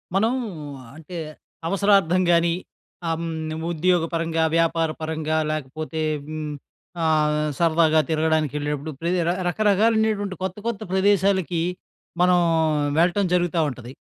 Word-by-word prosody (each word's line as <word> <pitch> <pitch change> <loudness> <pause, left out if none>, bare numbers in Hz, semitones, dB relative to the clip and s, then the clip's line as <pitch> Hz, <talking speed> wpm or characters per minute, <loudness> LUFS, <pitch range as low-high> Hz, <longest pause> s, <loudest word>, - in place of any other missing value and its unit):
మనం 220 +5 +3 0.6
అంటే 160 +3 -10 0.5
అవసరార్థం 195 -2 +3
గాని, 170 0 +3 0.6
హ్మ్. 160 -1 -3 0.2
ఉద్యోగ 175 +1 +2
పరంగా, 165 -1 0
వ్యాపార 165 -1 +2
పరంగా 155 0 -1
లేకపోతే, 155 +2 -4 0.3
హ్మ్. 155 -1 -5 0.5
ఆహ్, 150 -1 +2
సరదాగా 160 -1 +3
తిరగడానికి 160 -2 +1
ఎళ్ళినప్పుడు, 150 +1 -3
ప్రతి 175 +2 0 0.3
రకరకాలైనటువంటి 210 0 +2
కొత్త 190 0 -3
కొత్త 230 -2 -3
ప్రదేశాలకి, 190 -3 +2 0.6
మనం 180 0 +5 0.6
వెళ్ళటం 180 +4 +3
జరుగుతా 175 -1 +1
ఉంటది. 125 -2 -9
165 Hz, 100 wpm, -23 LUFS, 155-190 Hz, 0.6 s, మనం